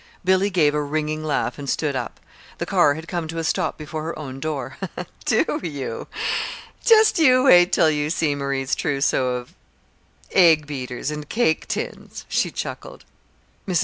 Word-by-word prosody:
Billy 190 +2 +3
gave 160 -6 +3
a 150 - 0
ringing 155 +1 -2
laugh 150 -1 -1
and 140 -1 -5
stood 145 -1 -1
up. 125 -2 -4 0.4
The - - -3
car 145 - +3
had 160 +2 -8
come 170 -2 -3
to 165 +1 -6
a 165 - -2
stop 170 +1 -1
before 155 0 -6
her 165 +2 -5
own 135 -3 -7
door. 135 -4 -4 0.5
"Do 295 +7 +1
you? 145 -5 -5 0.8
Just 440 -5 +5
you 255 -5 +5
wait 180 -8 +6
till 160 -2 +4
you 150 0 -1
see 155 -2 +1
Marie's 140 -1 -2
trousseau 135 -4 +1
of 125 0 -7 0.8
egg 165 -5 +5
beaters 130 -1 -4
and 150 -1 -6
cake 220 -9 +1
tins," - - -5
she - - 0
chuckled. - - -7 0.6
Mrs. 180 -4 +2
155 Hz, 165 wpm, -22 LUFS, 145-175 Hz, 0.8 s, wait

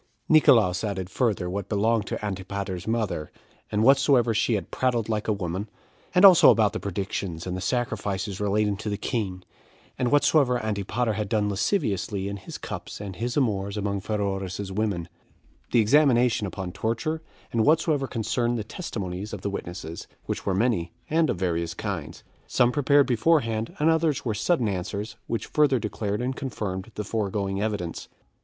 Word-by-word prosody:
6. - - -41
Nicolaus 115 - +5
added 95 -3 -3
further 105 -7 0
what 95 +2 -4
belonged 110 +1 +1
to - - -4
Antipater's 95 -1 -4
mother, 110 -9 -1 0.4
and 105 +1 +1
whatsoever 135 -2 +5
she 115 +1 +2
had 100 - -4
prattled 120 -4 0
like 110 -1 -1
a - - +2
woman; 100 +1 -3 0.5
as 180 +2 +7
also 185 -4 +9
about 105 -4 +4
the - - -3
predictions 95 -3 -4
and 90 -1 -3
the 95 - -4
sacrifices 100 -4 -2
relating 105 0 +1
to 105 +1 -5
the 100 - -2
king; 100 -6 -3 0.6
and 125 -1 +1
whatsoever 145 -3 +4
Antipater 110 +3 -1
had 105 -2 -3
done 105 -1 +1
lasciviously 100 - -1
in 100 0 -4
his 95 - -8
cups - - -7
and 100 -3 -7
his 120 +3 -2
amours 100 -6 0
among 100 -1 -1
Pheroras's 100 -2 -3
women; 100 -4 -1 0.6
the 120 - +5
examination 120 -3 +4
upon 95 -1 -5
torture; 115 - -2 0.3
and 115 -2 +2
whatsoever 155 -2 +2
concerned 120 +1 -1
the 110 - -3
testimonies 100 - -5
of 105 - -5
the 100 - -2
witnesses, 85 -3 -6 0.2
which - - -4
were 95 - +2
many, 100 -6 +1 0.2
and 160 0 +3
of - - 0
various 85 -2 -1
kinds; - - -5 0.2
some 120 0 +3
prepared 145 0 +4
beforehand, 115 -3 +1
and 155 +2 +3
others 160 -4 +1
were 115 - 0
sudden 115 - +1
answers, 100 +3 -3
which 115 - -2
further 145 -3 +3
declared 105 0 -2
and 130 +1 -2
confirmed 105 -6 -4
the 105 - -3
foregoing 100 -2 -2
evidence. 105 -6 -3
105 Hz, 165 wpm, -26 LUFS, 95-120 Hz, 0.6 s, also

